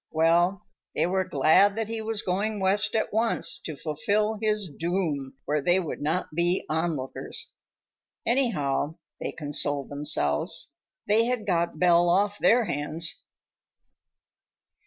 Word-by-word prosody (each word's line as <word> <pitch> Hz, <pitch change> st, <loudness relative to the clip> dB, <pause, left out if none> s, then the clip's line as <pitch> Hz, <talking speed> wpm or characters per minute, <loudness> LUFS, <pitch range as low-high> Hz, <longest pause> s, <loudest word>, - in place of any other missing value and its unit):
Well, 170 Hz, +4 st, +2 dB, 0.3 s
they -, -, +2 dB
were 190 Hz, +1 st, 0 dB
glad 160 Hz, +8 st, +4 dB
that 225 Hz, -1 st, -2 dB
he 225 Hz, 0 st, -4 dB
was 220 Hz, -1 st, -1 dB
going 205 Hz, +4 st, -1 dB
West 195 Hz, +3 st, +3 dB
at 220 Hz, -, -1 dB
once, 225 Hz, +1 st, +2 dB
to 155 Hz, -, -7 dB
fulfill 205 Hz, +9 st, -1 dB
his 210 Hz, -2 st, 0 dB
doom 160 Hz, -4 st, -3 dB
where 150 Hz, 0 st, 0 dB
they 175 Hz, +5 st, +3 dB
would 170 Hz, -5 st, -5 dB
not 155 Hz, +3 st, -2 dB
be 175 Hz, +3 st, 0 dB
onlookers. 155 Hz, -4 st, -3 dB, 0.7 s
Anyhow, 160 Hz, -, 0 dB, 0.2 s
they -, -, -4 dB
consoled 145 Hz, -2 st, -1 dB
themselves, 140 Hz, -, 0 dB, 0.3 s
they 220 Hz, +2 st, +4 dB
had 245 Hz, -3 st, -2 dB
got 170 Hz, -4 st, 0 dB
Belle 175 Hz, +1 st, +4 dB
off 200 Hz, +3 st, +1 dB
their 240 Hz, 0 st, +4 dB
hands. 155 Hz, +1 st, -3 dB
175 Hz, 130 wpm, -26 LUFS, 150-210 Hz, 0.7 s, glad